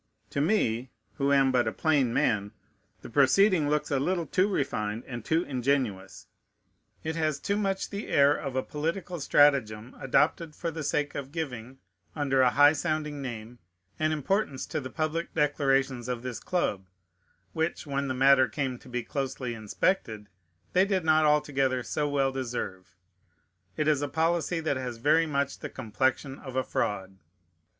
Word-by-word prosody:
To 140 - -1
me, 130 - +1 0.3
who 140 -1 +1
am 135 -1 +4
but 125 -1 +2
a - - +1
plain 145 -7 +1
man, 105 -3 0 0.5
the - - -8
proceeding 155 - +4
looks 150 0 0
a 140 - +2
little 170 +4 0
too 185 +5 +2
refined 115 - -2
and 120 -3 -7
too 160 +7 +1
ingenious; 120 - -2 0.8
it 160 0 -3
has 155 -3 0
too 200 - -1
much 195 -2 -1
the 200 +1 -5
air 145 0 +4
of 135 -3 -5
a 130 - 0
political 170 +4 -3
stratagem, 130 -6 +2
adopted 150 +4 +1
for 170 -1 -3
the 160 0 -6
sake 145 0 -1
of 140 -1 -6
giving, 135 -6 -5 0.4
under 135 -3 +2
a 125 - +5
high 145 +4 +6
sounding 155 -2 -2
name, 120 -2 -7 0.4
an 155 0 +1
importance 155 -1 -1
to 155 - -3
the 130 - -6
public 155 +3 -3
declarations 135 -4 +1
of 125 -1 -3
this 125 -3 -5
club, 100 - -2 0.7
which, 160 +1 -2
when 140 -1 -2
the 130 - -2
matter 135 0 +5
came 130 +1 -3
to - - -15
be 125 -1 -3
closely 130 -3 -3
inspected, 110 - -1 0.4
they 185 - +5
did 190 -3 0
not 155 -1 +4
altogether 135 -4 +2
so 145 +5 -1
well 135 -2 +1
deserve. 120 -8 -5 0.8
It 155 -1 0
is 150 -2 +3
a 145 - -1
policy 165 +2 0
that 155 -4 0
has 125 -2 -5
very 155 +7 +3
much 140 -2 -1
the - - -6
complexion 130 +3 -2
of 130 -2 -9
a 130 - +1
fraud. 95 -4 -3
140 Hz, 165 wpm, -28 LUFS, 125-155 Hz, 0.8 s, high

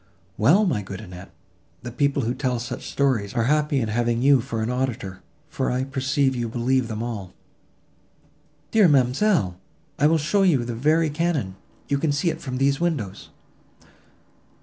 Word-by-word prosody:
"Well! 170 - +4
my 130 - 0
good 95 -1 -8
Annette, 90 -3 -10 0.5
the 120 - -6
people 140 +2 0
who 115 +2 -1
tell 130 -2 -1
such 120 +1 -6
stories, 125 -8 0
are 115 - +2
happy 150 +2 +1
in 115 -3 -2
having 120 +2 0
you 140 -2 +5
for 115 -3 -3
an 115 - -1
auditor, 120 -7 -3 0.3
for - - -2
I 125 +1 0
perceive 135 0 0
you 120 -2 -2
believe 125 +2 0
them 110 0 -4
all." 105 -6 -6 1.4
"Dear 215 -4 +5
ma'amselle! 135 - +2 0.4
I 145 - +5
will 165 +1 +3
show 170 +7 +1
you 155 -11 +3
the 120 - -4
very 155 +6 +2
cannon; 150 - -1 0.3
you 140 -1 0
can 155 0 +1
see 155 +4 +1
it - - -8
from 130 -4 -4
these 140 +1 +2
windows!" 150 - -3
130 Hz, 170 wpm, -23 LUFS, 115-145 Hz, 1.4 s, you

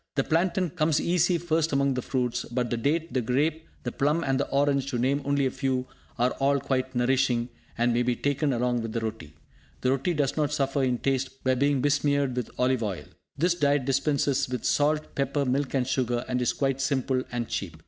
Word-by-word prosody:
The 135 - +2
plantain 175 +2 +1
comes 155 -3 +1
easy 175 0 +2
first 165 -1 0
among 140 -1 +2
the 125 - -2
fruits; 125 -1 -1
but 120 0 -2
the 120 - 0
date, 160 +7 -1
the 130 - +1
grape, 150 +7 0 0.2
the 120 - -3
plum 150 +6 +1
and 135 -2 0
the - - -1
orange, 140 -1 +1
to 130 -3 -2
name 135 +4 +1
only 140 -1 +1
a 130 - 0
few, 130 -1 -1 0.3
are 125 +1 +2
all 140 +1 +3
quite 130 -1 -2
nourishing, 125 -1 +1 0.3
and 120 +1 +2
may 120 - +2
be 125 0 +1
taken 145 +3 0
along 120 -1 0
with 115 -1 -5
the 115 - 0
roti. 110 -9 -6 0.5
The 130 - +2
roti 135 +6 0
does 145 -3 0
not 150 -2 0
suffer 140 -1 0
in 125 -2 +1
taste 135 +1 -2
by 130 - +3
being 140 +1 +2
besmeared 140 -2 +1
with 125 - -3
olive 125 -1 +2
oil. 95 -9 -3 0.3
This 170 +4 +3
diet 145 -5 +1
dispenses 140 0 +1
with 125 -2 -4
salt, 150 +1 +1
pepper, 140 +1 0
milk 135 +2 0
and 130 -2 +2
sugar, 125 -2 0
and 125 -1 -1
is 120 - +2
quite 135 -1 -1
simple 130 -1 0
and 120 -2 -2
cheap. 85 -5 -4
135 Hz, 210 wpm, -27 LUFS, 125-145 Hz, 0.5 s, all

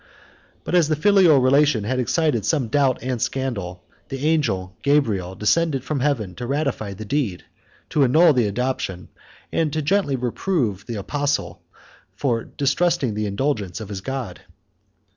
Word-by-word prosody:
But - - -5
as 175 -4 +4
the 155 - +1
filial 180 -2 +5
relation 135 -2 +3
had 130 +5 -1
excited 140 - +1
some 130 +1 0
doubt 135 -1 +1
and 125 -3 -2
scandal, 100 -10 -3 0.3
the 135 +1 -4
angel 105 - 0
Gabriel 110 -11 +1
descended 135 - +1
from 145 0 -2
heaven 125 -9 -1
to 120 - -5
ratify 135 -8 -2
the 110 +3 -8
deed, 110 -7 -2 0.5
to 145 - +3
annul 155 +5 +5
the 120 -5 +2
adoption, 100 -4 -3 0.4
and 160 -2 0
gently 185 -5 +2
to 125 - -6
reprove 120 - -1
the 120 - -4
apostle 145 +8 -2 0.5
for 120 -5 0
distrusting 145 -2 0
the 105 0 -2
indulgence 100 - -2
of 110 -3 -8
his 100 -2 -5
God. 130 -6 -5
130 Hz, 150 wpm, -22 LUFS, 105-150 Hz, 0.5 s, filial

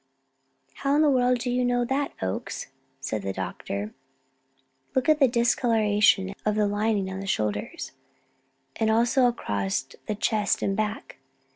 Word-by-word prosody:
"How 275 +1 +1
in 305 - +4
the 295 - +4
world 250 -1 +3
do 245 +1 -2
you 250 +1 +1
know 245 0 +1
that, 275 +3 -1
Oakes?" 95 +7 -4 0.3
said 110 -6 -3
the 95 0 -3
doctor. 100 +2 -4 1.0
"Look 260 +2 +1
at 310 -1 +4
the 270 - +6
discoloration 215 -5 +3
of 210 0 +1
the 210 -1 +2
lining 205 -1 0
on 190 - -5
the 195 - -6
shoulders, 105 - -2 0.9
and 220 - +1
also 235 +3 +4
across 105 - -1 0.2
the 215 - -1
chest 210 0 +1
and 195 - 0
back. 215 -8 -3
215 Hz, 150 wpm, -26 LUFS, 190-245 Hz, 1.0 s, the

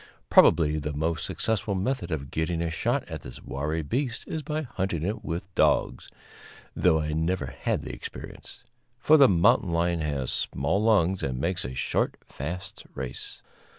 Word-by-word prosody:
Probably 75 -2 +6
the 75 0 -3
most 80 +2 -1
successful 110 -2 -1
method 100 0 -1
of 70 -5 -4
getting 80 +1 -1
a 85 - -2
shot 85 - 0
at - - -6
this 60 - -10
wary 75 +4 -2
beast 120 - -2
is 160 - -3
by 155 +1 -3
hunting 95 - -3
it 105 +5 -2
with 90 +2 -5
dogs - - +2 0.7
(though 80 -3 +3
I 75 0 -2
never 80 0 0 0.2
had - - 0
the - - -6
experience), - - -9 0.3
for 150 +5 +5
the 140 -4 +7
mountain 90 0 +4
lion 85 0 +1
has 70 -4 -2
small 80 +10 0
lungs 95 -5 +3
and 65 -2 -2
makes 85 +6 0
a 65 +1 -5
short, 65 - 0
fast 85 +6 -6
race. 65 -1 -6
85 Hz, 165 wpm, -27 LUFS, 75-95 Hz, 0.7 s, the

